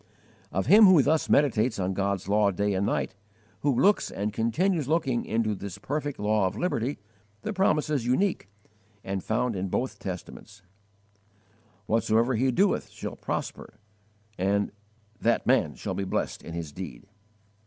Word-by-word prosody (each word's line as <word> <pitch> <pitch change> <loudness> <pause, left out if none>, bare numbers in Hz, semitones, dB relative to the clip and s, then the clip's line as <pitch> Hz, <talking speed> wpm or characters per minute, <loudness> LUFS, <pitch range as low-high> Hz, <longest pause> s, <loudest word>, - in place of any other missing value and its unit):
Of 95 - -1
him 210 - +8
who 175 -7 +7
thus 155 +3 +1
meditates 125 -5 +3
on 95 0 -1
God's 100 0 -1
law 105 0 +3
day 100 +2 0
and 95 +1 0
night, - - -1 0.5
who 145 - +1
looks 205 +1 +3
and 105 +1 -3
continues 155 - 0
looking 140 -6 0
into 110 -1 0
this 100 -1 -7
perfect 145 +6 -3
law 105 -1 +2
of 95 - -5
liberty, 140 -7 -1 0.5
the 215 - -3
promise 185 -6 +2
is 145 -5 0
unique, 130 - 0 0.5
and 95 -1 -3
found 115 +1 0
in 95 +1 -2
both 110 +2 -2
Testaments: 95 +2 -8 1.2
"Whatsoever 115 +3 +2
he 130 +3 +2
doeth 195 +10 +1
shall - - -7
prosper"; - - -5 0.6
"that 105 +3 -2
man - - +2
shall - - -4
be 100 - -2
blessed 95 - -2
in 85 - -9
his 80 -3 -5
deed." 75 -5 -8
110 Hz, 150 wpm, -27 LUFS, 100-140 Hz, 1.2 s, him